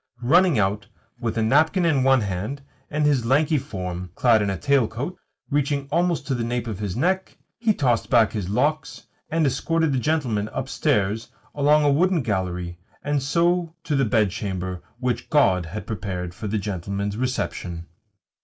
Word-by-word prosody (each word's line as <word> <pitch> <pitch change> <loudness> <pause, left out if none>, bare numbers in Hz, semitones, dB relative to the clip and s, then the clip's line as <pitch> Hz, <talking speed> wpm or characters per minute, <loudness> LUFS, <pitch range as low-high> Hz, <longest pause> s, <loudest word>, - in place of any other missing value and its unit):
Running 170 +3 +4
out 100 +1 0 0.3
with 115 -2 -2
a 110 - +2
napkin 160 - +3
in 155 -5 +3
one 135 -1 +4
hand 105 +8 -4 0.3
and 150 0 0
his 140 -5 +3
lanky 145 +5 +2
form 90 -5 -5
clad 115 -4 +4
in 100 - 0
a 95 - -2
tailcoat, 140 - 0 0.4
reaching 140 -1 0
almost 170 +1 +1
to 135 - -1
the 120 -2 -1
nape 120 0 -2
of 110 -4 -5
his 100 -4 -3
neck, 185 +8 0 0.2
he 225 -2 +3
tossed 125 - +1
back 115 -4 +4
his 100 -5 -4
locks, 145 +9 -1 0.2
and 160 0 +1
escorted 160 +3 +1
the 130 - +1
gentleman 120 -8 0
upstairs, 105 +3 0 0.3
along 150 +1 +4
a 145 - +4
wooden 170 +1 +2
gallery, 90 -4 -2 0.2
and 145 -1 0
so 170 +3 +1
to 150 - -1
the 135 - +3
bedchamber 95 -5 -1 0.2
which 125 0 -2
God 95 - +3
had 100 +3 -6
prepared 90 -4 -4
for 105 +4 -6
the 105 +2 -1
gentleman's 100 +1 -3
reception. 100 -8 -3
120 Hz, 165 wpm, -23 LUFS, 100-150 Hz, 0.4 s, Running